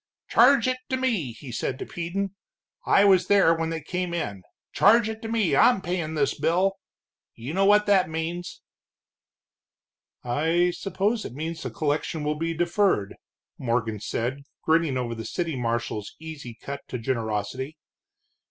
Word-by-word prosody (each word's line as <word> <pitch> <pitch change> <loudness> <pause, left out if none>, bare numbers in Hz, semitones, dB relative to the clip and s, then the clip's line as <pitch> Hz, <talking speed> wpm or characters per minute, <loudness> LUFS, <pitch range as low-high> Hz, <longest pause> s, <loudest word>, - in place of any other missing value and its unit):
'Charge 255 0 +5
it 255 0 0
to 260 - 0
me' 225 - 0
he 125 +3 -10
said 125 +3 -2
to - - -5
Peden 180 +3 -3 0.5
I 200 - +5
was 190 -3 +5
there 195 -5 +5
when 165 0 -2
they 165 -1 -3
came 180 +2 -3
in 100 - -3 0.3
'charge 220 +2 +5
it 220 0 -5
to 225 - -5
me, 225 -5 +1
I'm 245 -5 +5
payin' 175 -3 -3
this 145 -2 +1
bill.' 180 +6 +1 0.6
You 125 +7 -6
know 195 +2 +3
what 210 +1 +5
that 195 -5 +3
means." 165 +2 -4 1.6
"I 165 +8 +2
suppose 200 +5 -1
it - - -7
means 160 +2 -4
that - - -4
the - - -17
collection 155 +1 -1
will 150 +1 0
be 165 0 -1
deferred," 175 - +1 0.5
Morgon 115 -3 -1
said, 120 +6 -3 0.2
grinning 160 -4 +2
over 120 -2 -2
the 115 -1 -6
city 165 - -3
marshal's 115 -3 -3
easy 150 -7 -8
cut 140 0 -6
to 125 - -4
generosity. 120 +4 -3
165 Hz, 160 wpm, -25 LUFS, 130-195 Hz, 1.6 s, Charge